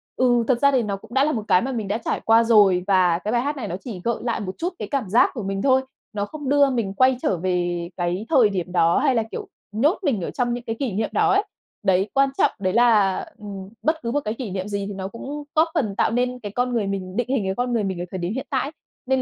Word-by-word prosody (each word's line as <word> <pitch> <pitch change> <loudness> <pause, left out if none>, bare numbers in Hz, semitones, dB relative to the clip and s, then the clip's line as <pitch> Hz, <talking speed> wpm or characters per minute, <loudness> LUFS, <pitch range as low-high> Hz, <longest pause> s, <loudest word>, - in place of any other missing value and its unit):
"Ừ, 245 -2 +3
thực 255 -3 +2
ra 280 0 +5
thì 260 -3 +2
nó 205 -2 -2
cũng 220 +4 -13
đã 270 +1 +4
là 305 - +2
một 220 -6 -2
cái 180 - +4
mà 265 - -2
mình 225 -6 -3
đã 205 - 0
trải - - -2
qua 225 +1 +5
rồi 205 -6 +5
và 180 -3 +3
cái 210 +4 -3
bài 240 - +2
hát 290 +3 -2
này 235 -6 -4
nó 175 - -4
chỉ 210 -8 -7
gợi 235 0 +1
lại 235 -1 -1
một 190 -2 -5
chút 350 +3 -2
cái - - -4
cảm 265 -9 -1
giác 225 +6 +5
của 230 -6 -5
mình 195 0 -2
thôi. 265 +1 +4 0.3
Nó 205 -1 -1
không 290 +3 -6
đưa 285 -1 +5
mình 230 -7 -1
quay 255 +4 +3
trở 185 - +1
về 175 -1 -1
cái 175 +3 -2
thời 250 -9 +5
điểm 180 -2 -3
đó 170 -1 +3
hay 260 - +2
là, 225 - +2
kiểu, - - -6 0.2
nhốt 270 - +2
mình 260 - +1
ở - - -3
trong 240 -1 -1
những 240 0 -5
cái 225 -2 -3
kỷ 265 -5 -1
niệm 215 +2 -1
đó 415 -2 +3
ấy." 395 +2 +3 0.4
Đấy, 190 0 +2
quan 275 0 +4
trọng - - +4
đấy 185 -2 0
là, 215 -5 +4 0.2
ừm, 200 -2 -8
bất 315 +1 0
cứ 235 - -2
một 290 - +1
cái 215 - -1
kỷ 230 -4 -6
niệm 190 +1 -3
gì 200 -1 -3
thì 205 - -5
nó 190 0 -5
cũng 280 +8 -7
góp 315 +2 +4
phần 220 - -1
tạo - - +1
nên 250 +1 0
cái 205 -4 -7
con 245 0 0
người 220 -4 0
mình, 190 -1 -4
định 245 +1 -1
hình 265 -6 +1
cái 190 - 0
con 245 0 -1
người 225 -3 +1
mình 190 -3 -3
ở 175 - -3
thời 190 - -4
điểm 175 +2 -3
hiện 265 - -4
tại 265 - 0
ấy. - - -7 0.3
Nên 265 0 +1
225 Hz, 295 wpm, -23 LUFS, 195-255 Hz, 0.4 s, ra